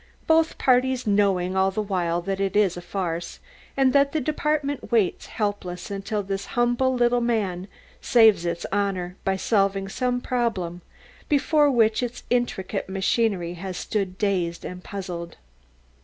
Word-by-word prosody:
both 320 0 +3
parties 255 0 +2
knowing 195 -3 +2
all 190 0 +3
the 195 - -4
while 175 -4 -1
that 195 +1 -2
it 195 -1 -1
is 205 -4 +3
a 175 - -6
farce, 175 -2 -4 0.4
and 265 -1 +4
that 280 0 +3
the 315 - +1
department 295 -1 -1
waits 220 -6 +1
helpless 200 -4 -3
until 200 +1 -3
this 195 0 -4
humble 245 +2 +2
little 240 0 +2
man 200 -6 -1 0.3
saves 220 -7 +5
its 170 0 -3
honour 190 -3 -1
by 195 - +1
solving 195 -1 +1
some 245 +5 -1
problem 210 -9 -2 0.5
before 295 0 +3
which 225 -4 +3
its 245 0 -4
intricate 210 -6 -1
machinery 190 -2 0
has 180 +1 -6
stood 195 -4 -2
dazed 180 -5 -1
and 180 0 -7
puzzled. 180 -4 -6
200 Hz, 145 wpm, -24 LUFS, 185-245 Hz, 0.5 s, saves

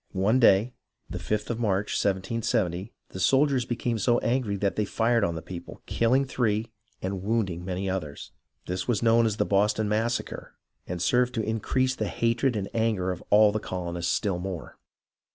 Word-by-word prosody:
One 105 +7 +3
day, 115 +1 +5 0.4
the - - -4
5th 105 +2 -2
of 115 - -3
March, 100 -3 0
1770, 95 -1 -1 0.2
the 95 - -8
soldiers 135 +3 +3
became 120 -1 -2
so 120 +4 +3
angry 120 -4 0
that 100 0 -1
they 105 - +1
fired 115 +2 +1
on 85 -4 0
the 80 - -6
people, 90 -2 -9
kill 115 +2 +2
ing 135 +1 +3
three 115 -4 -1 0.3
and 95 0 -3
wounding 100 -5 -1
many 95 +1 -3
others. 90 -7 -4 0.3
This 90 0 -3
was 120 -2 0
known 115 0 +4
as 105 -1 -2
the - - +1
Boston 105 +2 +2
Massacre, 115 +3 -2 0.3
and 90 0 -4
served 125 +8 +2
to 110 - 0
increase 130 +4 0
the - - -3
hatred 115 +2 +1
and 100 -2 -2
anger 110 -5 0
of 90 - -6
all 105 0 +6
the 110 - -1
colonists 85 -3 -3
still 95 -4 0
more. 90 -2 -6
105 Hz, 180 wpm, -27 LUFS, 95-115 Hz, 0.4 s, all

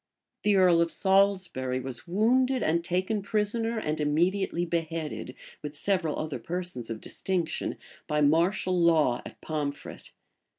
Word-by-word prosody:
The 210 -1 +3
earl 180 -3 +5
of 170 - +2
Salisbury 190 -10 +1
was 130 +1 -6
wounded 245 +6 +2
and 170 0 +1
taken 185 +4 -1
prisoner, 220 +3 0
and 155 -7 -2
immediately 175 +4 +1
beheaded, 165 -2 -3 0.3
with 150 0 -6
several 180 -3 0
other 155 -2 -3
persons 175 -9 -4
of 115 -1 -4
distinction, 180 -4 -2 0.3
by 150 0 +1
martial 170 +5 +2
law 155 -7 +3
at - - -13
Pomfret. 145 -2 -5
170 Hz, 130 wpm, -28 LUFS, 150-195 Hz, 0.3 s, earl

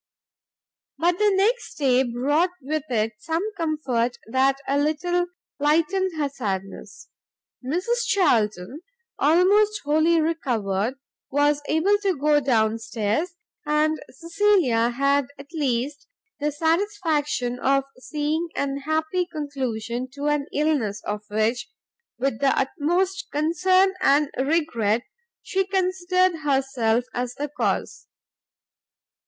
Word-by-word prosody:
But 345 +4 +1
the 420 -1 +4
next 450 +6 +1
day 260 -3 +3
brought 270 +8 +1
with 300 +1 -3
it 225 -2 0
some 325 - -2
comfort 275 -8 -1
that 260 +4 +2
a 280 +1 +1
little 350 +4 0 0.3
lightened 330 +5 +1
her 290 - +1
sadness; 195 -8 -6 0.5
Mrs 425 - -1
Charlton, 225 - +1 0.4
almost 400 +7 +4
wholly 315 +3 +3
recovered, 245 -9 -1 0.3
was 290 +1 +2
able 380 +7 +2
to 390 -5 0
go 295 +1 +3
down 225 -5 +1
stairs, 225 - -2 0.3
and 305 +1 +1
Cecilia 335 - +2
had 275 +2 +1
at 280 +4 -13
least 280 -1 -2 0.3
the 295 +1 0
satisfaction 320 -6 0
of 275 +1 +2 0.2
seeing 305 +4 -2
an 275 -1 -1
happy 315 +5 -1
conclusion 255 -6 -4
to 285 +1 -5
an 295 -1 0
illness 280 -9 0
of 210 0 -3
which, 220 +2 0 0.5
with 260 -2 -1
the 275 -1 +2
utmost 350 +8 0
concern 370 +5 +3
and 285 +1 +3
regret, 260 -6 +1 0.4
she 385 0 0
considered 370 -2 +1
herself 265 -5 +1
as 245 0 -3
the 290 +1 -4
cause. 295 - -2
295 Hz, 115 wpm, -24 LUFS, 250-335 Hz, 0.5 s, the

